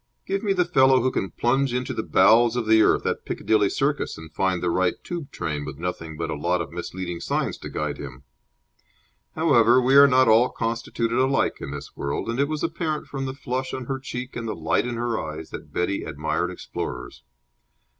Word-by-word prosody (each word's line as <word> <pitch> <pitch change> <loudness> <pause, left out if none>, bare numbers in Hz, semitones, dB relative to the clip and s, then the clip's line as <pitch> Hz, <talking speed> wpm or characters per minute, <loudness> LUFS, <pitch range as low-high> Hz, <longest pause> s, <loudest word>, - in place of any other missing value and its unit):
Give 195 0 -1
me 205 - 0
the 180 -2 +2
fellow 130 -6 +5
who 130 - +2
can 95 - -2
plunge 125 +5 +1
into 125 0 -2
the - - -2
bowels 120 +1 +4
of 120 -2 -1
the 110 0 +5
earth - - +3
at - - -1
Piccadilly 105 -2 +1
Circus 145 +1 -1
and 80 0 -11
find 95 -2 0
the 90 - +1
right 90 +1 +1
Tube 170 -5 -5
train 75 -2 -4
with 70 -1 -7
nothing 80 -2 -5
but - - -3
a - - -2
lot 85 +5 0
of 85 - -5
misleading 85 0 -5
signs - - -1
to - - -7
guide - - -3
him. 65 -1 -9 1.1
However, 130 -7 +5
we 130 +2 +3
are 140 0 +9
not 130 -1 +4
all 115 +3 +5
constituted 115 +1 -2
alike 135 +1 +2
in - - -5
this 70 0 -8
world, 70 +10 -3
and 120 - -3
it 140 - +3
was 155 0 -3
apparent 155 -3 -2
from 135 -1 -4
the 130 - -5
flush 130 -1 -3
on 130 - -5
her 135 +1 -3
cheek 130 -1 -6
and 115 -1 -4
the 110 - -3
light 80 +8 0
in 120 - -3
her 120 -1 -1
eyes 80 0 -6
that - - -9
Betty 95 +3 -1
admired 75 +1 -2
explorers. - - -6
115 Hz, 210 wpm, -24 LUFS, 85-130 Hz, 1.1 s, are